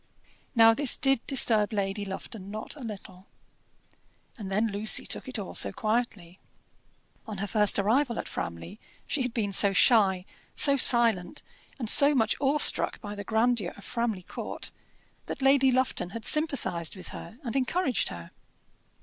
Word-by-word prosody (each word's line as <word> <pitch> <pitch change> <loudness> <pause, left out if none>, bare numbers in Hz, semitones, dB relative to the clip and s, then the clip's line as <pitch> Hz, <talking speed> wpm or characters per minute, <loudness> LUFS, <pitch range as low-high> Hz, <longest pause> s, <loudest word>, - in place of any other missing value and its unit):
Now 225 -1 +6
this 280 +1 +1
did 270 -2 +1
disturb 225 -6 +3
Lady 200 -1 -3
Lufton 195 +1 -9
not 215 +7 -8
a - - -13
little. 195 -4 -10 1.1
And 200 -4 -9
then 215 +3 -1
Lucy 205 +2 +1
took - - -2
it 255 - -6
all 200 -3 -7
so 100 - 0
quietly. 215 - -4 0.9
On 215 -2 -7
her 200 - -4
first 210 0 +1
arrival 235 +5 0
at - - -5
Framley 85 - -7 0.3
she 285 - -3
had 250 -1 -3
been 220 -4 -3
so 200 0 +6
shy, 195 -4 +3 0.3
so 280 -1 +4
silent, 235 -8 +4 0.3
and 240 -5 -6
so 285 +6 +6
much 225 -3 +1
awestruck 285 +2 +3
by 205 -2 -8
the 205 0 -8
grandeur 220 -3 -1
of 200 - -14
Framley 230 -5 -4
Court, - - -7 0.6
that - - -6
Lady 270 -1 +3
Lufton 255 -8 -1
had 225 +4 -7
sympathized 275 - 0
with 185 -2 -11
her 220 - -11
and 240 -1 -5
encouraged 270 - -1
her. 85 -1 -11
220 Hz, 160 wpm, -26 LUFS, 195-250 Hz, 1.1 s, Now